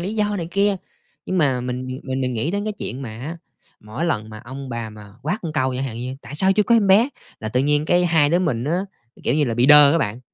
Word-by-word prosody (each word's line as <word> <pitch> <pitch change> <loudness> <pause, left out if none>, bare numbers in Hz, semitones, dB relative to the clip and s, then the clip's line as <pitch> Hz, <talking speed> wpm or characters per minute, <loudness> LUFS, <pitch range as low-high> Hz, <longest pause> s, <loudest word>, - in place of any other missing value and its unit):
lý 195 +5 -3
do 210 -1 0
này 170 -2 -4
kia. 200 +1 +2 0.5
Nhưng 185 - 0
mà 135 -6 +2
mình 125 +1 -4 0.2
mình 130 0 -3
mình 130 -1 -1
nghĩ 115 +8 -1
đến 200 +2 -2
cái 215 - -2
chuyện 135 -8 -6
mà 120 - -6
á, 160 +6 -5 0.4
mỗi 110 +10 -5
lần 110 -11 -1
mà 110 - -8
ông 135 +2 -8
bà 115 -2 -4
mà 105 -1 -13
quát 165 +9 -1 0.2
câu 130 -2 +1
chẳng 135 - -2
hạn 115 -3 -5
như: 130 +2 -5
"Tại - - -9
sao 190 +5 +3
chưa 210 +2 +3
có 235 - +3
em 215 -3 +4
bé?", 210 +7 +5 0.3
là 110 - -4
tự 125 +3 +1
nhiên 145 +2 +2
cái 175 +2 +3
hai 160 -4 +3
đứa 170 - +3
mình 130 -10 -1
á, 165 +5 0 0.5
kiểu 120 - +2
như 150 - +3
là 120 -4 -1
bị 120 +2 +3
đơ 145 -1 +8
á 165 - +3
bạn. 115 -3 -2
145 Hz, 275 wpm, -21 LUFS, 125-175 Hz, 0.5 s, đơ